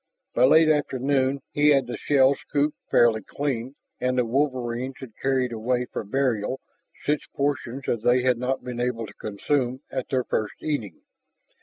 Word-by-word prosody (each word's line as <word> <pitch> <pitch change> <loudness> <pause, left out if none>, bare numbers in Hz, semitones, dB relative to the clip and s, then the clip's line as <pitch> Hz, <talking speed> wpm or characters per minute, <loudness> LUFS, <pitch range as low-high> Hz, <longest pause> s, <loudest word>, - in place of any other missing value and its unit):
By - - +5
late 160 +4 +6
afternoon 140 -2 +1
he 145 0 +4
had 135 -3 +4
the 120 - -5
shell 135 -1 +4
scooped 145 +2 -1
fairly 115 -2 +4
clean 135 -2 -3 0.2
and 125 0 0
the 125 - +3
wolverines 130 0 -1
had 130 -3 -9
carried 130 -2 +1
away 120 +2 -1
for - - -3
burial 125 +1 0 0.5
such 150 0 -1
portions 140 -2 -2
as 115 - 0
they 125 +2 +3
had 125 -2 +2
not 130 +2 -1
been 125 -1 -5
able 120 -2 -1
to 105 - -12
consume 125 +5 -1
at 130 - -3
their 130 -2 +1
first 110 -3 -2
eating. 115 - -3
130 Hz, 165 wpm, -25 LUFS, 120-140 Hz, 0.5 s, late